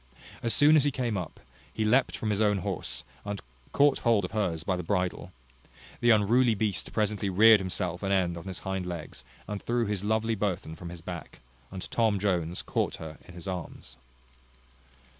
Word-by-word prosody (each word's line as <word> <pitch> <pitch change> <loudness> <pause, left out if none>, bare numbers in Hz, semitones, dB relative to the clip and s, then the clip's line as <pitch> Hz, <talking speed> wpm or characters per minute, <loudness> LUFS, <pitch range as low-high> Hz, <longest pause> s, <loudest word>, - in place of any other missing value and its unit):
As 115 - +1
soon 150 +5 +6
as 150 - +5
he 145 - +3
came 125 -5 -2
up, 90 -4 -5 0.3
he 110 - -2
leapt 125 +5 +3
from 110 - -2
his 105 +1 0
own 105 -2 +3
horse, - - -3 0.2
and 100 -1 -4 0.3
caught 140 -1 +4
hold 115 -5 +3
of - - -7
hers 90 -7 -1
by 95 - 0
the 90 - -3
bridle. 90 0 -2 0.7
The 120 - +3
unruly 115 +2 +4
beast 100 -4 -1
presently 105 -2 0
reared 110 +3 +7
himself 90 -2 -3
an 95 - -1
end 90 -3 +2
on 85 - -8
his 95 -2 -5
hind 95 -1 -2
legs, 85 -7 -6 0.2
and 105 -1 -4
threw 120 0 0
his 100 -2 -2
lovely 110 +2 +1
burthen 95 -6 -2
from 85 +1 -8
his 85 -1 -9
back, - - -8 0.3
and 95 -1 -7 0.3
Jones 90 -4 -1
caught - - -1
her 80 -1 -9
in 90 - -12
his 90 0 -9
arms. 90 -4 -6
100 Hz, 185 wpm, -28 LUFS, 90-110 Hz, 0.7 s, reared